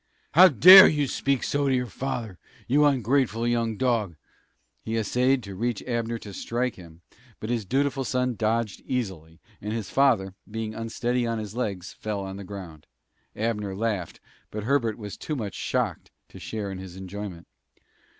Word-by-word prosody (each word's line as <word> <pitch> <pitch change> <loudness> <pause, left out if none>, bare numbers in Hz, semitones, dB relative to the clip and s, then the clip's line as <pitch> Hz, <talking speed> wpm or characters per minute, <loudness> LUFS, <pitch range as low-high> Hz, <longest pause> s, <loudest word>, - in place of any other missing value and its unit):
"How 185 +4 +9
dare 185 - +10
you 150 -2 +1
speak 135 0 0
so 145 0 0
to 135 - +3
your 125 0 0
father, 115 -3 -5 0.3
you 145 +4 +4
ungrateful 125 -3 +1
young 115 -2 0
dog!" 115 -8 0 0.7
He 115 +1 -3
essayed 125 +4 +1
to 100 -1 -8
reach 115 +3 -2
Abner 115 -1 -2
to 105 -3 -10
strike 120 +4 -2
him, 85 -2 -14 0.4
but 110 - -4
his 115 -4 -1
dutiful 135 +4 0
son 125 -2 0
dodged 110 -1 -1
easily, 90 -10 -4 0.2
and 105 - -4
his 110 -4 -4
father, 115 -9 +3 0.2
being 110 0 -4
unsteady 120 +2 -2
on 115 0 -1
his 105 -2 -6
legs, 100 -7 -3
fell 105 -2 -4
on 95 0 -6
the 100 - -7
ground. 90 -6 -9 0.5
Abner 105 -3 -2
laughed, 105 -5 -3 0.3
but 105 0 -5
Herbert 115 -3 +1
was 105 -3 -8
too 155 - -4
much 105 -7 -4
shocked - - -2 0.2
to - - -12
share 105 -3 -5
in 95 - -6
his 95 -2 -9
enjoyment. 95 -2 -7
115 Hz, 170 wpm, -26 LUFS, 100-125 Hz, 0.7 s, dare